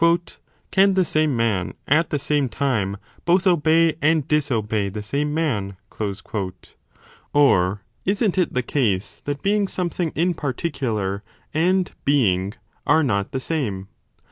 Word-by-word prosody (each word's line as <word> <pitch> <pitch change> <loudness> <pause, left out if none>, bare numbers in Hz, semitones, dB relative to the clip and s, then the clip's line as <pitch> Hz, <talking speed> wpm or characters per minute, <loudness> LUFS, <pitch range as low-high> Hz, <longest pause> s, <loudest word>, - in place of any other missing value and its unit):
Can 195 0 +4
the 185 -1 +3
same 155 -5 +1
man 110 -6 0
at 160 +4 +3
the 145 - 0
same 145 -1 0
time 110 -6 -1 0.3
both 180 +3 +3
obey 165 -2 +3
and 155 -1 +2
disobey 110 -9 0
the 105 +2 -6
same 145 +7 -1
man? 110 - -1 1.6
Or 100 -9 +3 0.2
isn 200 +2 +2
t 185 - +1
it - - -1
the 125 - +1
case 110 -8 -1
that 145 0 -3
being 205 0 +2
something 175 -3 -2
in 175 +3 +2
particu 140 -4 -2
lar 100 -1 -2 0.3
and 180 +4 +2
Being 100 -8 +2 0.3
are 160 - +5
not 100 -7 0
the 130 - -2
same 110 -11 -3
145 Hz, 140 wpm, -22 LUFS, 105-165 Hz, 1.6 s, are